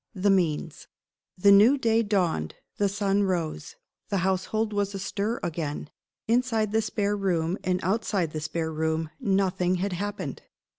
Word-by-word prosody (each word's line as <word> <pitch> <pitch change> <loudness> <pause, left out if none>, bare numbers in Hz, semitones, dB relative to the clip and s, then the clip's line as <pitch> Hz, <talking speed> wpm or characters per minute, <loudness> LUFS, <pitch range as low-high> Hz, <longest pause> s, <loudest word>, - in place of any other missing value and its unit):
THE 200 +1 +2
MEANS. 165 -4 0 0.5
THE 200 +2 +5
new 215 +8 +7
day 230 -3 +2
dawned; 180 - 0 0.2
the 200 -1 +2
sun 200 0 +1
rose; 170 - -2 0.3
the 200 - 0
household 210 +3 0
was 200 -1 -1
astir 205 +4 -2
again. 150 -3 -4 0.4
Inside 230 -3 +1
the 220 +1 +2
spare 205 -1 -1
room, 180 -3 0
and 185 0 0
outside 195 -4 0
the 155 - -4
spare 160 +1 -3
room, 160 0 -1
nothing 190 -5 +1
had 190 +1 -2
happened. 205 +3 -4
195 Hz, 145 wpm, -26 LUFS, 170-205 Hz, 0.5 s, new